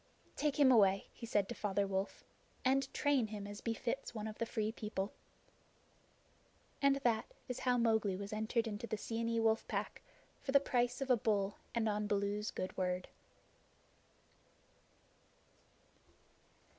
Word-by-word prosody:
"Take 295 -1 0
him 270 -3 +7
away," 200 -5 +4
he 230 - -8
said 205 -3 +2
to - - -4
Father 200 -3 0
Wolf, 195 0 -2 0.4
"and 270 +1 +2
train 280 -6 +2
him 210 -1 -6
as 205 0 -7
befits 235 +2 -3
one 215 -1 -3
of 215 -1 -6
the 230 - 0
Free 215 -2 -1
People." 210 -3 -3 1.7
And 275 0 +5
that 230 -2 +1 0.2
is 250 - -4
how 250 -1 +2
Mowgli 220 -4 +2
was 200 +2 -5
entered 220 +2 0
into 215 +2 -4
the 215 - -2
Seeonee 230 +1 -1
Wolf 225 0 +2
Pack - - -3 0.4
for 270 - -3
the 280 - +8
price 245 -2 0
of 270 -1 +1
a 250 - +6
bull 205 -2 +1 0.2
and 230 -1 +2
on 210 0 0
Baloo's 205 0 0
good 185 - -4
word. 180 -1 -1
220 Hz, 145 wpm, -36 LUFS, 205-240 Hz, 1.7 s, the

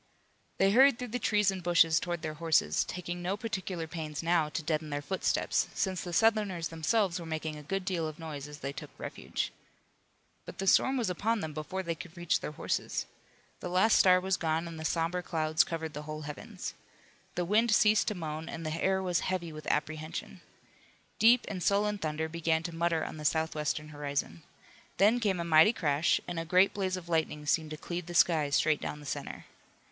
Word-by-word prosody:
They 195 0 +4
hurried 265 +3 +6
through 250 -1 -5
the 245 +3 -2
trees 210 -3 +2
and 190 -1 -5
bushes 165 -2 +4
toward 175 -1 -4
their 155 -1 -3
horses, 155 - +2
taking 175 -1 -5
no 185 +3 -1
particular 190 -6 -4
pains 155 -2 -5
now 165 -2 +2
to 160 +1 -4
deaden 155 0 -1
their 145 0 -2
footsteps, 190 +5 0
since 190 -2 -1
the 175 - -5
Southerners 205 -5 +2
themselves 180 +3 +1
were 170 - -7
making 160 -1 -3
a 150 - -8
good 190 +6 -3
deal 175 -4 -1
of 155 0 -7
noise 150 -4 -6
as 150 0 -11
they 140 0 -4
took - - -8
refuge. - - -4 0.9
But - - -10
the 195 - -3
storm 265 +7 +4
was 225 -7 0
upon 215 +5 0
them 160 -2 -4
before 155 +5 -4
they 170 -2 -1
could 165 +1 -11
reach 175 -1 +1
their 150 - -5
horses. - - -2 0.5
The 180 - -5
last 185 +5 +4
star 185 -1 +6
was 190 +1 0
gone 160 +1 -1
and 165 -1 -8
the 160 - -5
somber 170 +2 0
clouds 155 -2 +2
covered 160 -2 -5
the 150 - -5
whole 155 0 -6
heavens. 150 -1 -7 0.6
The 175 - 0
wind 220 +6 +3
ceased 215 0 +4
to 210 - 0
moan 160 -2 -5
and 165 0 -6
the 155 +1 -3
air 190 0 +2
was 180 -2 +1
heavy 180 -3 -2
with 155 -1 -9
apprehension. 155 +1 -3 0.8
Deep 235 +2 +6
and 185 -3 -4
sullen 205 +2 +1
thunder 160 -1 -2
began 160 0 0
to 170 - -5
mutter 165 -1 0
on - - -7
the 155 - -7
southwestern 155 -1 -1
horizon. 145 - -3 0.6
Then 210 +6 +4
came 200 -6 0
a - - -1
mighty 160 +6 +6
crash 150 -4 +2
and 175 -2 -3
a - - -2
great 180 +4 +4
blaze 190 -2 -1
of 175 -2 -9
lightning 160 -3 -1
seemed 155 +1 +1
to 155 - -6
cleave 175 +1 -5
the 175 - -6
sky 160 -4 +4
straight 155 +1 +2
down 150 - -4
the 145 - -12
center. 140 - -5
170 Hz, 205 wpm, -30 LUFS, 155-190 Hz, 0.9 s, hurried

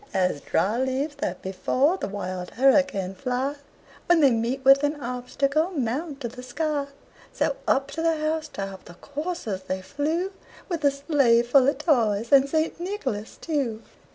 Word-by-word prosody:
As 180 -6 +1
dry 215 +5 0
leaves 265 +3 -1
that 305 +2 -4
before 255 - +1
the - - -3
wild 185 -3 -5
hurricane 265 -8 +3
fly, 255 +8 -2 0.5
When 345 -1 +5
they 280 -4 +6
meet 240 +4 -1
with 275 +1 +7
an 290 +1 0
obstacle, 275 +5 -1
mount 275 +4 -2
to 240 - -2
the 250 +2 -9
sky, 285 +3 -2 0.4
So, - - 0
up 270 0 +2
to 325 - -4
the 330 -1 +2
house 310 0 -1
top 195 -8 -7
the 175 - -12
coursers 285 - -4
they 185 0 -3
flew, 315 - -1 0.4
With 335 -4 -3
a - - +7
sleigh 275 -4 +3
full 255 +2 +4
of 280 - +2
toys, 235 -8 +1
and 275 0 +6
St. 315 +2 0
Nicholas 285 - -4
too. 265 -9 -2
275 Hz, 165 wpm, -25 LUFS, 230-305 Hz, 0.5 s, with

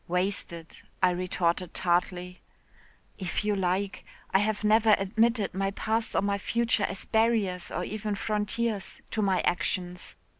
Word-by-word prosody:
'Wasted,' 180 -2 -2 0.2
I 180 - +6
retorted 180 -1 -1
tartly. 180 0 0 0.8
'If 185 +2 -2
you 210 -1 +2
like. 190 +1 -1 0.3
I 190 - +6
have 215 +1 0
never 215 0 +5
admitted 220 +2 +1
my 195 +1 0
past 220 +3 -1
or - - +2
my 200 0 0
future 230 -1 +1
as 195 - -4
barriers 220 -6 +1
or 180 - -3
even 210 +1 -3
frontiers 210 0 -1
to 220 - 0
my 195 -3 +2
actions. 180 0 -2
195 Hz, 140 wpm, -28 LUFS, 180-215 Hz, 0.8 s, I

